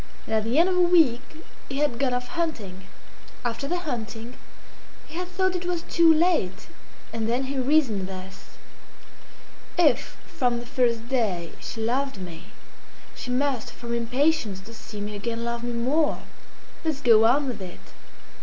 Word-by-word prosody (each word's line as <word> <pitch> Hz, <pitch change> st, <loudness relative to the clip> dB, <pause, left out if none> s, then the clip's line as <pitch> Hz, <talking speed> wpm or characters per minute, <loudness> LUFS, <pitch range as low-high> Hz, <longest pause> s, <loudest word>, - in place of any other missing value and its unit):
And -, -, -4 dB
at 220 Hz, -1 st, +2 dB
the 235 Hz, +5 st, +1 dB
end 340 Hz, +3 st, +6 dB
of 375 Hz, -, +1 dB
a 360 Hz, -, +4 dB
week 325 Hz, -9 st, +5 dB, 0.5 s
he 270 Hz, -, -3 dB
had 290 Hz, -5 st, +1 dB
gone 270 Hz, -2 st, +2 dB
off 250 Hz, 0 st, -2 dB
hunting. 215 Hz, -, -3 dB, 0.6 s
After 240 Hz, +3 st, -2 dB
the 355 Hz, -, 0 dB
hunting 235 Hz, -5 st, -5 dB, 0.7 s
he -, -, -14 dB
had 360 Hz, +2 st, -3 dB
thought 370 Hz, 0 st, 0 dB
it 360 Hz, -, -2 dB
was 350 Hz, -2 st, -1 dB
too 335 Hz, -1 st, +5 dB
late, 315 Hz, -, +2 dB, 0.4 s
and 225 Hz, -1 st, -1 dB
then 245 Hz, +3 st, +1 dB
he 270 Hz, 0 st, -2 dB
reasoned 255 Hz, -8 st, +2 dB
thus 190 Hz, 0 st, -10 dB, 1.2 s
"If 305 Hz, -8 st, +3 dB
from 245 Hz, -2 st, 0 dB
the 240 Hz, -, -8 dB
first 235 Hz, -3 st, +1 dB
day 205 Hz, -10 st, 0 dB
she 225 Hz, -, -6 dB
loved 260 Hz, +2 st, 0 dB
me, 175 Hz, -3 st, -8 dB, 0.7 s
she -, -, -7 dB
must 255 Hz, -1 st, 0 dB
from 235 Hz, -1 st, -5 dB
impatience 235 Hz, -2 st, +1 dB
to 225 Hz, +4 st, -12 dB
see 215 Hz, -2 st, -8 dB
me 210 Hz, 0 st, -4 dB
again 230 Hz, +3 st, -3 dB
love 235 Hz, 0 st, -3 dB
me 240 Hz, 0 st, -2 dB
more. 275 Hz, +7 st, +1 dB, 0.6 s
Let's 310 Hz, -3 st, -1 dB
go 225 Hz, -4 st, +6 dB
on 275 Hz, +5 st, +4 dB
with 230 Hz, -6 st, -4 dB
it!" 180 Hz, -2 st, -10 dB
245 Hz, 165 wpm, -26 LUFS, 225-295 Hz, 1.2 s, end